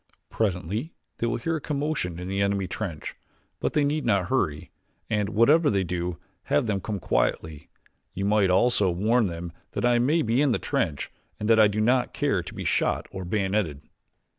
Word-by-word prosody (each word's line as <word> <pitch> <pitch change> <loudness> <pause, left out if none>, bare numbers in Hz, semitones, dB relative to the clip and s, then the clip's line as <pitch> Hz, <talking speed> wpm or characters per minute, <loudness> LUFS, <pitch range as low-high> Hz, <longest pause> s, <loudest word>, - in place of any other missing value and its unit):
Presently 105 - -2 0.2
they 115 - 0
will 115 - 0
hear 165 +7 -1
a - - -8
commotion 140 - -2
in 90 +1 -6
the 95 +1 -1
enemy 100 -1 +1
trench; 85 -4 -5 0.5
but - - -1
they 150 - +3
need 150 +1 0
not 100 -5 +1
hurry, 75 - -1 0.4
and, 105 -2 +1
whatever 145 +9 +4
they 100 -2 +1
do, 90 -1 -3 0.3
have 145 -1 +2
them 100 -3 -1
come 105 0 -4
quietly. 75 +3 -1 0.5
You 95 - -2
might 105 -2 +3
also 100 +1 +3
warn 110 +6 +2
them 85 0 -6 0.2
that - - -1
I 120 -1 +4
may 150 +7 +2
be 115 +4 +2
in 140 -4 +3
the - - +2
trench 95 - -2 0.3
and 105 - -2
that 110 - +6
I 110 - +8
do 105 +1 -2
not 125 +3 +2
care - - +1
to - - -9
be - - -5
shot - - +1
or 95 -1 -6
bayoneted." 95 -5 -1
105 Hz, 190 wpm, -26 LUFS, 90-125 Hz, 0.5 s, I